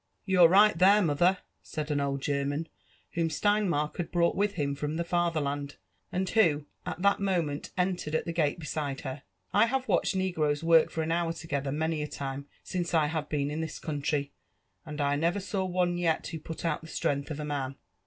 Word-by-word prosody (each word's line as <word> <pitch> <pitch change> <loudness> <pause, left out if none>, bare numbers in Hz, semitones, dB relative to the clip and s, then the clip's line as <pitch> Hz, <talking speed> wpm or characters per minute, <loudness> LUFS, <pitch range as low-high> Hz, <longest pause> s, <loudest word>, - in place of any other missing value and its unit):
You're 185 -3 +6
right 205 +3 +6
(here, 200 +3 +7
mother," 175 +1 +3 0.2
said 155 0 -5
an 145 -1 +1
old 140 -1 -2
German 145 +2 -1 0.4
whom 165 -1 0
Stein 205 +5 +2
mark 150 -1 -1
had 175 -3 -3
brought 170 -1 +2
with 205 +1 +1
him 145 -4 -1
from 150 +2 -3
the 170 - -1
Fatherland, 155 -5 -1 0.4
and 185 +1 -1
who 160 -9 +3 0.2
at 180 0 -4
that 200 0 +4
mo 190 -4 +1
ment 145 -1 -5
entered 180 -4 0
at - - 0
the 170 - -3
gate 155 -2 +1
beside 150 -4 -3
her. 135 +1 -5 0.2
*' - - -40
I 210 +3 +5
have 265 +2 -1
watched - - +2
negroes 160 -6 0
work 165 -1 +5
tor 160 - -1
an 160 - -2
heur 170 0 +1
togetheir, 145 -4 -3
many 160 +1 -1
a 150 - -2
time, 140 0 -5 0.2
since 175 -2 -2
I 155 -2 +4
have 150 -1 -3
been 145 -1 -1
in 155 +2 -2
this 160 - -4
country, 145 -1 -2 0.6
and 150 0 -6
I 145 0 +2
Dovor 170 +6 +1
saw 195 0 -2
one 180 -1 0
yet 165 -2 +1
who 165 - -5
put 160 +2 -7
out 165 - 0
the 160 - -11
stren^h 140 -2 -1
of 150 -1 -5
a 150 - -3
man. 140 -2 -3
160 Hz, 215 wpm, -29 LUFS, 145-180 Hz, 0.6 s, here